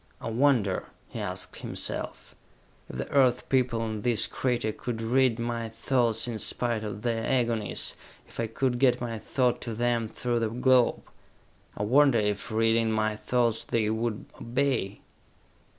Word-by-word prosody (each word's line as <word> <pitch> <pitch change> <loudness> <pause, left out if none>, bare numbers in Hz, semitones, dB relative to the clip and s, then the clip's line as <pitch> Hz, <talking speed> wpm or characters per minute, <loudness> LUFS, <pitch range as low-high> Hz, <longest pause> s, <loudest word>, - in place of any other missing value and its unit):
"I 115 - -4
wonder," 115 -6 +2 0.2
he - - -6
asked - - -5
himself, - - -5 0.6
"if - - -7
the 65 - -5
Earth 130 -3 +3
people 125 -3 +1
in 110 -1 -4
this 120 -2 +2
crater 120 -4 -1
could 115 +1 -5
read 120 +1 +2
my 115 -1 -3
thoughts 115 0 0
in 115 -2 -4
spite 115 -1 -1
of 105 0 -6
their 115 -2 0
agonies, 115 -4 +1 0.3
if - - -13
I 115 - 0
could 120 +2 -1
get 125 -2 +4
my 115 -2 -4
thought 125 +2 0
to 115 -2 -4
them 120 -1 +1
through 120 +2 -2
the 115 -1 0
globe? 125 +1 +3 0.7
I 105 - -1
wonder 135 +3 +5
if, 105 0 -1
reading 115 0 +2
my 110 -1 +1
thoughts, 115 0 0
they 110 -2 0
would 110 -1 -2 0.2
obey?" 120 -5 -1
115 Hz, 155 wpm, -28 LUFS, 110-125 Hz, 0.7 s, wonder